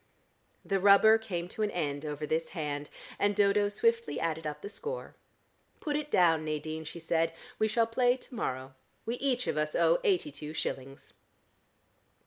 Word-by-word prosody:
The 195 -1 +1
rubber 205 +3 +7
came 180 -6 -4
to 220 - -6
an 210 - +2
end 145 -5 -2
over 150 0 -3
this 160 +2 -1
hand, 145 -2 -3 0.3
and 205 0 +2
Dodo 205 0 +3
swiftly 460 - +1
added 160 -1 -2
up 150 0 -6
the - - -4
score. 470 - -6 0.7
"Put 295 -2 -2
it 300 0 -2
down, 165 - +4
Nadine," 155 +1 -4
she 170 - -7
said. 165 0 0 0.3
"We 220 - +3
shall 225 +1 +2
play 245 +2 +2
to 260 - -15
morrow. 130 - -3 0.3
We 235 +2 -2
each 250 -2 0
of - - -1
us 150 0 -1
owe - - +4
eighty 370 -9 +2
two 155 - -8
shillings." 135 -3 -5
180 Hz, 170 wpm, -30 LUFS, 155-230 Hz, 0.7 s, rubber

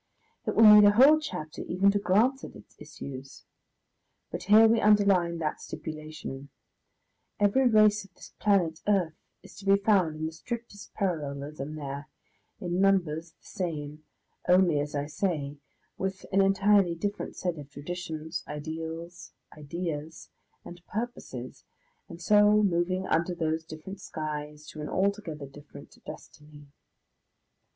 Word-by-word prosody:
It - - -1
will 225 - +6
need 210 0 +10
a 205 0 +7
whole 280 +8 +7
chapter 180 - -6
even 195 +3 +2
to 205 - 0
glance 220 +9 +2
at - - -9
its - - -16
issues. 135 0 -10 0.9
But - - -5
here 215 +3 +7
we 225 0 +3
underline 200 -5 +3
that 155 -2 -3
stipulation; 155 -3 -7 0.9
every 210 +6 +3
race 215 -2 +4
of 190 -2 -19
this - - -14
planet 180 -6 +2
earth 185 -6 +2 0.3
is - - -14
to 195 - -11
be 195 - +7
found 195 -6 +2
in 155 +1 -4
the 160 - -3
strictest 215 +4 -8
parallelism 150 -5 -3
there, 140 0 -6 0.5
in 180 +1 -1
numbers 170 -5 +1
the - - -34
same 155 -6 -5 0.5
only, 180 -4 +4
as 145 +1 -3
I 145 0 -1
say, 150 -3 -2 0.4
with 190 0 -3
an 195 0 +4
entirely 195 -2 +3
different 205 +5 -4
set 175 -4 -3
of 145 -1 -10
traditions, 160 +2 -6
ideals, 160 +3 -7 0.2
ideas, 155 0 -6 0.3
and 175 0 -11
purposes, 200 - -6 0.5
and 170 - -10
so 210 +2 +5
moving 185 0 0
under 170 +2 0
those 160 -1 -1
different 165 +5 -9
skies 150 -3 -6
to 155 - -8
an 150 - -5
altogether 190 -7 -1
different 145 +1 -14
destiny. 150 -1 -12
170 Hz, 140 wpm, -28 LUFS, 150-200 Hz, 0.9 s, need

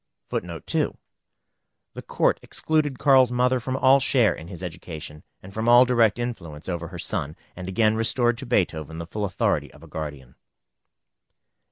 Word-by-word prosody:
] - - -53
[Footnote 85 -3 -4
2: - - -1 1.0
The - - -7
Court - - +1
excluded 155 -4 -1
Carl's 135 -3 +5
mother 125 +1 +2
from 130 +2 -3
all 135 +1 +5
share 125 -6 +3
in 80 - -10
his 90 -1 -8
education, 80 -3 -8 0.2
and 95 +1 -11
from 110 +2 0
all 120 +1 +8
direct 120 -4 +3
influence 90 -12 -6
over 85 -2 -3
her 90 +1 -9
son, 75 -2 -3 0.2
and 90 +1 -6
again 110 +3 +3
restored 120 +1 +1
to 135 - -7
Beethoven 80 - 0
the 85 - -5
full 105 +4 -3
authority 95 - 0
of 75 - -17
a - - -12
guardian. 75 -5 -7
105 Hz, 170 wpm, -24 LUFS, 80-125 Hz, 1.0 s, all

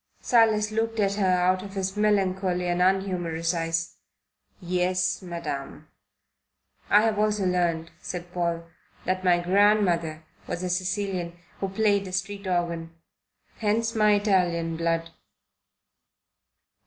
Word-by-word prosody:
Silas 220 -3 +3
looked 225 +1 -1
at 200 -1 +2
her 200 -2 +1
out 185 0 +2
of 195 0 -9
his 190 0 -2
melancholy 190 -3 +1
and 175 0 0
unhumorous 180 -3 +1
eyes. 165 0 -2 0.6
"Yes, 180 +1 0
Madam." 170 -6 -6 1.0
"I 205 - +6
have 220 -2 +1
also 210 -2 +1
learned," 170 -3 0
said 175 0 -7
Paul, 170 -1 -1 0.4
"that 185 0 -1
my 180 -1 +4
grandmother 175 -4 +2 0.2
was 175 - -4
a 180 - -1
Sicilian 185 -1 -2 0.2
who 195 - -2
played 200 0 +1
a - - -7
street 200 +2 -3
organ. 170 -2 -2 0.6
Hence 225 +1 0
my 215 -2 +4
Italian 180 -5 +1
blood." 165 0 -1
185 Hz, 120 wpm, -26 LUFS, 175-205 Hz, 1.0 s, I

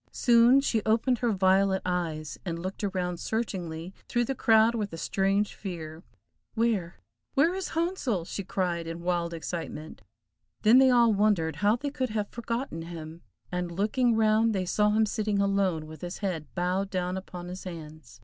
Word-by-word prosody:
Soon 240 +2 +5
she 230 -5 0
opened 230 +3 +2
her 240 -2 +1
violet 190 0 +3
eyes, 165 -4 -3
and 170 -3 -3
looked 185 +5 -6
around 180 -3 -2
searchingly 180 -7 -3 0.2
through 240 -1 +1
the 270 - -1
crowd 225 -2 +4
with 210 -3 -2
a 165 - -7
strange 195 +4 0
fear. 165 -5 -7 0.5
"Where, 215 -7 0 0.4
where, 315 +6 +4
is 380 -1 -3
Handsel?" 305 - -1
she 200 - -5
cried, 175 -3 -2
in 165 +1 -6
wild 175 -1 0
excitement. 160 -4 -6 0.6
Then 230 +4 +7
they 265 0 +6
all 235 -3 +5
wondered 200 -6 +1
how 210 +2 +3
they 280 +4 -4
could 260 -2 -2
have 210 -1 -2
forgotten 235 -6 -4
him, 165 0 -8 0.3
and 180 -1 -2
looking 220 +6 +1
round 220 0 +3
they 185 -1 -1
saw 210 +3 +2
him 215 +1 +3
sitting 210 -1 -1
alone, 195 -5 +1
with 155 -1 -11
his 175 +1 -5
head 175 -7 -3
bowed 185 +2 0
down 180 -1 -2
upon 180 -2 -7
his 185 +2 -8
hands. 155 -7 -9
195 Hz, 170 wpm, -28 LUFS, 175-225 Hz, 0.6 s, Then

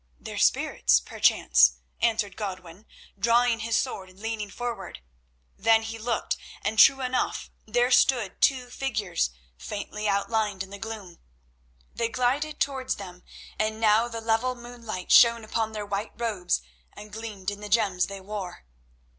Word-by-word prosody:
"Their - - -6
spirits, - - +3
perchance," 65 +1 +4 0.3
answered 220 -4 +1
Godwin, 185 -1 -7 0.3
drawing 235 +2 +3
his 225 +1 0
sword 195 -8 -3
and 185 +1 -19
leaning 220 -1 -4
forward. 240 +3 -5 0.6
Then 225 0 +4
he 225 0 -6
looked, 230 +1 -1 0.3
and 220 +1 -1
true 270 +3 +7
enough 255 0 -2 0.2
there 245 +3 +2
stood 240 -6 +3
two 250 -3 +2
figures 215 - -1 0.3
faintly 210 - -5
outlined 205 -1 0
in 190 - -13
the 200 - -8
gloom. 215 -6 -8 0.7
They 230 -1 -1
glided 265 +6 0
towards 265 -2 -1
them, 180 -3 -10 0.4
and 215 0 -1
now 220 +1 +4
the 230 -1 -6
level 225 +3 +1
moonlight 235 -6 -7
shone 235 -1 +7
upon 220 0 -2
their 210 -1 -4
white 205 +2 -4
robes 210 -7 -1 0.3
and 210 0 -12
gleamed 210 -3 -5
in 205 - -8
the 210 - -7
gems 195 -4 +2
they 200 -1 -8
wore. 190 - -7
220 Hz, 145 wpm, -26 LUFS, 200-235 Hz, 0.7 s, true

